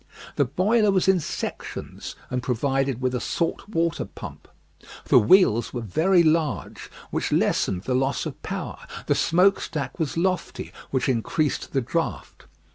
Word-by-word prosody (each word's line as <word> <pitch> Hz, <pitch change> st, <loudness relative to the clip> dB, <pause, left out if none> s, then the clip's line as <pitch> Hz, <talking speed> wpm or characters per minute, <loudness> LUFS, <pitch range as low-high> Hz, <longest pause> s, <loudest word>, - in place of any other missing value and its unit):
The 140 Hz, -, +3 dB
boiler 205 Hz, -, +2 dB
was 190 Hz, -1 st, +2 dB
in 190 Hz, -1 st, +5 dB
sections 155 Hz, -, -6 dB, 0.2 s
and 125 Hz, 0 st, -1 dB
provided 135 Hz, +1 st, 0 dB
with 130 Hz, 0 st, 0 dB
a 125 Hz, -, 0 dB
salt 170 Hz, +9 st, -2 dB
water 170 Hz, -4 st, 0 dB
pump. -, -, -10 dB, 0.6 s
The -, -, +6 dB
wheels 120 Hz, -, +4 dB
were 120 Hz, -, -2 dB
very 170 Hz, -, +3 dB
large, 155 Hz, -3 st, 0 dB, 0.2 s
which -, -, -1 dB
lessened 95 Hz, -1 st, +1 dB
the 130 Hz, -, -1 dB
loss 135 Hz, +2 st, 0 dB
of -, -, -6 dB
power; -, -, -5 dB, 0.3 s
the -, -, +3 dB
smoke 185 Hz, +4 st, +3 dB
stack 140 Hz, -6 st, -4 dB
was 160 Hz, -1 st, -2 dB
lofty, 185 Hz, +1 st, -1 dB, 0.2 s
which 130 Hz, -, 0 dB
increased 135 Hz, +5 st, -1 dB
the 135 Hz, -, +2 dB
draught. 165 Hz, +7 st, -3 dB
150 Hz, 150 wpm, -24 LUFS, 125-175 Hz, 0.6 s, The